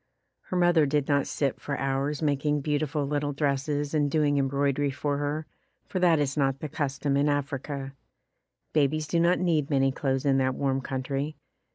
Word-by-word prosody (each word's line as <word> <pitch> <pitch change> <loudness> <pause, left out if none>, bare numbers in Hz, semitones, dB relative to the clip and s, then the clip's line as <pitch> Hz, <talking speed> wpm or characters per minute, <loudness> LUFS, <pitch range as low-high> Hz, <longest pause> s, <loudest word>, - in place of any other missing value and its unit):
Her 185 - -3
mother 175 -4 +4
did 145 0 0
not 140 -1 +2
sit 140 -3 -1
for 140 -1 -3
hours 135 +3 -1
making 145 0 +1
beautiful 150 0 -1
little 145 0 -1
dresses 145 +1 -1
and 145 -2 +2
doing 145 -1 +2
embroidery 140 +1 +1
for 140 +1 -2
her, 145 +2 -2 0.4
for 185 - -3
that 175 -3 +4
is 140 -2 0
not 135 -2 +1
the 155 - -5
custom 140 0 -1
in 145 +1 +3
Africa. 140 -1 -3 0.8
Babies 155 +1 +2
do 170 +2 0
not 170 +2 +4
need 160 -5 +1
many 135 -2 +3
clothes 135 0 -1
in 135 -1 +3
that 130 0 +1
warm 135 -1 0
country. 135 +3 -3
145 Hz, 175 wpm, -27 LUFS, 135-150 Hz, 0.8 s, mother